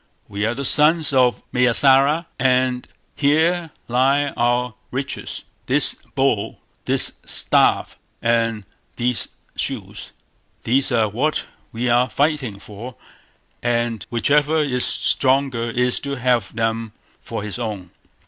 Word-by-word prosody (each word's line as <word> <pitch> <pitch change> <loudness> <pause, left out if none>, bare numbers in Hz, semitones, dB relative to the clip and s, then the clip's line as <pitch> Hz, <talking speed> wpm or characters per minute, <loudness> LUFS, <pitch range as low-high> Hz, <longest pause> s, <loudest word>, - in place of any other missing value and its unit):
"We 105 +1 -2
are 115 - -2
the 140 +2 -4
sons 155 +2 +4
of 125 -4 +2
Mayâsara, 135 +6 +4
and 125 -1 +1 0.3
here 160 +4 +2 0.2
lie 135 +4 +2
our 120 -1 0 0.2
riches; 130 +1 -5 0.2
this - - +5 0.2
bowl, 115 -6 0 0.3
this - - +3
staff, - - +1 0.2
and 115 -3 0 0.3
these 125 0 -1 0.3
shoes; - - -4 0.5
these 135 +4 +1
are 115 -3 +2
what 130 +9 -1 0.3
we 120 +2 -3
are 120 +1 +3
fighting 145 -8 -1
for, 105 +5 -10 0.7
and 120 -2 -1
whichever 145 +6 +2
is 135 -5 +1
stronger 130 -3 +1
is 125 +1 0
to 140 -1 -4
have 125 -5 0
them 115 -1 -2 0.3
for - - -6
his 105 +3 -6
own." 105 -6 -5
125 Hz, 120 wpm, -20 LUFS, 115-140 Hz, 0.7 s, this